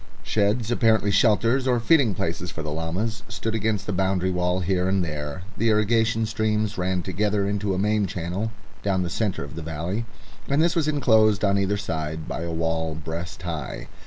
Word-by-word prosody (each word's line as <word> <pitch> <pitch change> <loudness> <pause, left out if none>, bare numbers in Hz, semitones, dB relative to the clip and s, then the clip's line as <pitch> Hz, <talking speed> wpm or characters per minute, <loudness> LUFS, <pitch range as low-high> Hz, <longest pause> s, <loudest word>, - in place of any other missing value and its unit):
Sheds, 110 +2 +1
apparently 110 -4 +3
shelters 115 +5 +3
or 125 -2 +3
feeding 120 - +4
places 85 +2 -2
for 80 -2 -6
the 75 - -4
llamas, 85 +8 -2
stood 115 - -3
against 110 -2 0
the 105 - -2
boundary 95 0 +1
wall 90 +1 0
here 90 0 +1
and 95 -2 +1
there. 75 +2 -5 0.2
The 115 - +3
irrigation 110 +1 +2
streams 110 -1 0
ran 90 -1 -1
together 100 +2 0
into 100 -1 0
a - - -2
main 105 +1 +2
channel 90 +6 -3 0.3
down 95 -2 +1
the 85 - -3
centre 100 -4 -1
of 70 -1 -9
the 85 - -6
valley, 85 +8 -3 0.4
and 140 +1 +1
this 170 +2 +3
was 160 -3 +1
enclosed 110 -8 +4
on 100 0 +3
either 100 +1 +1
side 80 -5 -3
by - - -4
a 85 0 -3
wall 80 -1 -1
breast 80 +3 -6
high. 80 -7 -5
100 Hz, 190 wpm, -24 LUFS, 85-110 Hz, 0.4 s, feeding